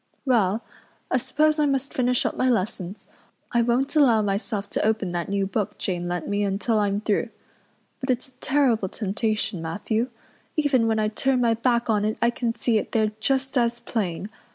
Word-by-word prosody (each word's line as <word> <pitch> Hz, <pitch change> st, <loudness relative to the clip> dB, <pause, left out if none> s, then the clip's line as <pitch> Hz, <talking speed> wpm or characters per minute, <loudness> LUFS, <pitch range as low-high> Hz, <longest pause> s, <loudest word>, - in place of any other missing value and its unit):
"Well, 225 Hz, -4 st, +2 dB, 0.5 s
I -, -, +4 dB
suppose 300 Hz, +5 st, +1 dB
I 300 Hz, -, +3 dB
must 275 Hz, -1 st, -1 dB
finish 250 Hz, -1 st, +1 dB
up -, -, 0 dB
my 255 Hz, -, +2 dB
lessons. 195 Hz, -3 st, -2 dB, 0.5 s
I 235 Hz, -, +3 dB
won't 245 Hz, +5 st, +1 dB
allow 240 Hz, -8 st, +5 dB
myself 200 Hz, 0 st, -2 dB
to -, -, 0 dB
open 215 Hz, -4 st, +1 dB
that 175 Hz, +1 st, -3 dB
new 200 Hz, 0 st, +1 dB
book 195 Hz, +1 st, -2 dB
Jane 175 Hz, -2 st, -2 dB
lent 175 Hz, -1 st, -3 dB
me 205 Hz, 0 st, 0 dB
until 205 Hz, +3 st, +1 dB
I'm 205 Hz, 0 st, 0 dB
through. 215 Hz, +2 st, 0 dB, 0.7 s
But 260 Hz, -, -5 dB
it's 255 Hz, +1 st, 0 dB
a -, -, -20 dB
terrible 255 Hz, -8 st, +2 dB
temptation, 215 Hz, -2 st, -1 dB
Matthew. 215 Hz, +8 st, -1 dB, 0.5 s
Even 270 Hz, -6 st, +3 dB
when 220 Hz, -1 st, +1 dB
I 215 Hz, 0 st, +2 dB
turn 255 Hz, +4 st, +1 dB
my 235 Hz, -2 st, +3 dB
back 235 Hz, +1 st, +1 dB
on 210 Hz, -2 st, +2 dB
it 215 Hz, +1 st, 0 dB
I 235 Hz, -, +3 dB
can 240 Hz, -1 st, -1 dB
see 230 Hz, -1 st, +1 dB
it -, -, -7 dB
there 215 Hz, -1 st, +2 dB
just 270 Hz, +3 st, 0 dB
as 235 Hz, 0 st, +1 dB
plain. 205 Hz, -4 st, -3 dB
225 Hz, 190 wpm, -25 LUFS, 205-250 Hz, 0.7 s, allow